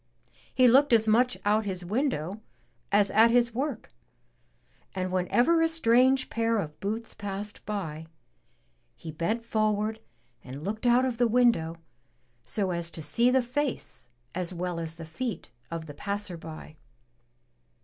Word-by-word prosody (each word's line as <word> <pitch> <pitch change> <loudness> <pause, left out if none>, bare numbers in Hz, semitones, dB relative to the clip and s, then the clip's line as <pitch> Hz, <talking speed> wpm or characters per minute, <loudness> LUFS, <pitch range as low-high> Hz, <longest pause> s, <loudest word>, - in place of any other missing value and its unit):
He 255 -1 +5
looked 265 +2 +5
as 220 -1 +4
much 245 +3 +3
out 210 +1 +3
his 185 -3 -3
window 210 - -2 0.5
as 200 -1 +3
at 225 +2 +6
his 235 -1 +3
work, 270 0 -3 1.0
and 185 -1 -2
whenever 240 - +2
a 325 - +3
strange 260 -3 +3
pair 230 0 +1
of 150 -7 -4
boots 220 +3 -4
passed 205 0 -6
by, 160 -7 -4 0.9
he 160 - -8
bent 170 +9 -2
forward 215 0 0 0.4
and 135 +3 -8
looked 215 +5 -2
out 245 +2 +5
of 245 -3 -3
the 240 - +4
window, 230 -9 +2 0.7
so 195 -3 -1
as 170 -1 -2
to 160 -1 -7
see 235 +12 +2
the 260 0 +3
face 260 - -3 0.2
as 180 0 -2
well 180 -1 -3
as 165 -1 -5
the 165 -1 -9
feet 180 - -5 0.2
of 165 -1 -5
the 145 - -9
passer 200 +3 -4
by. 155 -1 -10
210 Hz, 150 wpm, -28 LUFS, 170-240 Hz, 1.0 s, at